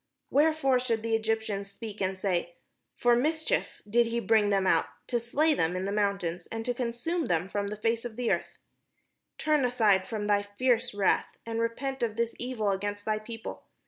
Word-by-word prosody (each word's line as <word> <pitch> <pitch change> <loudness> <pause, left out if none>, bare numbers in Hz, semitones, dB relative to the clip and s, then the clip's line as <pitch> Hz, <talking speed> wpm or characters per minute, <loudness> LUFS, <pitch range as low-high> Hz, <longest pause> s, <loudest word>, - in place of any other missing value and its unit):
Wherefore 290 -3 +3
should 230 -3 -1
the 230 0 -1
Egyptians 220 -3 -1
speak, 210 +1 -8
and 190 0 0
say, 175 -3 -1 0.2
' - - -52
For 240 0 +5
mischief 315 +6 0
did 235 +3 +3
he 235 +1 -1
bring 220 -3 +3
them 195 -1 +2
out, 165 -3 +3 0.2
to 240 - +1
slay 295 +7 +2
them 165 - 0
in 185 +1 -2
the 200 - -1
mountains, 200 -4 -1
and 225 0 -5
to 245 - +1
consume 250 +8 -2
them 170 +1 +1
from 200 +1 -2
the 210 - -4
face 230 +2 0
of 240 -3 -6
the 245 0 0
earth'? - - -2 0.8
Turn 300 -5 +2
from 215 -2 +2
thy 205 -1 +3
fierce 230 +3 0
wrath, 200 -2 +1
and 230 0 -3
repent 265 +4 -2
of 225 -3 0
this 230 0 -1
evil 235 -5 -1
against 205 +1 -3
thy 215 -1 0
people. 225 +1 -7
225 Hz, 190 wpm, -29 LUFS, 200-245 Hz, 0.8 s, For